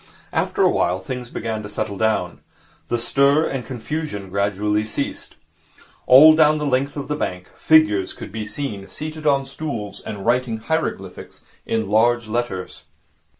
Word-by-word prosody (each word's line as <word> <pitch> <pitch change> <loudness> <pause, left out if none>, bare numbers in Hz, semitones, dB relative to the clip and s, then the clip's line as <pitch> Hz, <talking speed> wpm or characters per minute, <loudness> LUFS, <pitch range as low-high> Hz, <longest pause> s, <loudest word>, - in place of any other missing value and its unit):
After - - +1
a - - +6
while 90 +2 +1
things 125 0 -6
began 110 -2 -4
to 105 - -8
settle 105 0 -3
down. 110 +2 0 0.5
The 120 - 0
stir 140 +6 +3
and 135 -2 -3
confusion 120 - -5
gradually 100 +2 0
ceased. 110 - -5 0.7
All 150 +5 +9
down 155 -1 +4
the 150 - -2
length 140 +1 0
of 140 - -4
the 150 - -1
bank, 90 -10 -4
figures 155 -12 +3
could - - -9
be 110 -1 -5
seen, 105 -7 -5
seated 155 0 -6
on 140 -1 +3
stools 135 -7 -5
and 100 -2 -7
writing 120 -1 +1
hieroglyphics 110 - -4 0.2
in 110 -2 -1
large 115 +2 +2
letters. 110 -5 -4
120 Hz, 150 wpm, -21 LUFS, 105-140 Hz, 0.7 s, All